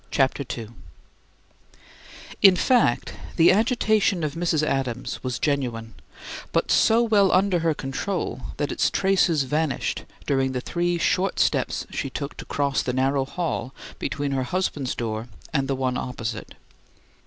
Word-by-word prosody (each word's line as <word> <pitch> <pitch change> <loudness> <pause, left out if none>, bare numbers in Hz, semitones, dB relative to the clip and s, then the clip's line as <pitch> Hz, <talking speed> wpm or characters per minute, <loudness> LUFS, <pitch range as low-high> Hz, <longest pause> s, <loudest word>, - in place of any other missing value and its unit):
CHAPTER 135 0 +1
II 115 -3 -7 1.7
In 195 -2 +8
fact, 230 - +2 0.2
the 165 - +6
agitation 215 -4 +2
of 150 -2 -1
Mrs. 165 -2 0
Adams 130 -4 -2
was 125 -2 -2
genuine, 120 -5 -2 0.6
but - - +1
so 230 +2 +4
well 205 -4 +4
under 185 -1 +3
her 165 -2 +1
control 145 +2 -3 0.2
that 145 - -1
its - - +1
traces 190 -6 +2
vanished 150 0 -1 0.2
during 135 -1 +1
the 125 - -1
three 175 +3 -1
short 180 +2 +1
steps - - +1
she 135 - -3
took 140 +2 -5
to - - -8
cross 140 -1 0
the 125 - -2
narrow 135 +1 +1
hall 140 -4 -3 0.2
between 145 -1 -2
her 135 -1 0
husband's 145 -4 -2
door 110 0 -3 0.3
and 135 -2 +1
the 135 - 0
one 130 -1 -1
opposite. 115 -3 -5
140 Hz, 145 wpm, -24 LUFS, 130-180 Hz, 1.7 s, In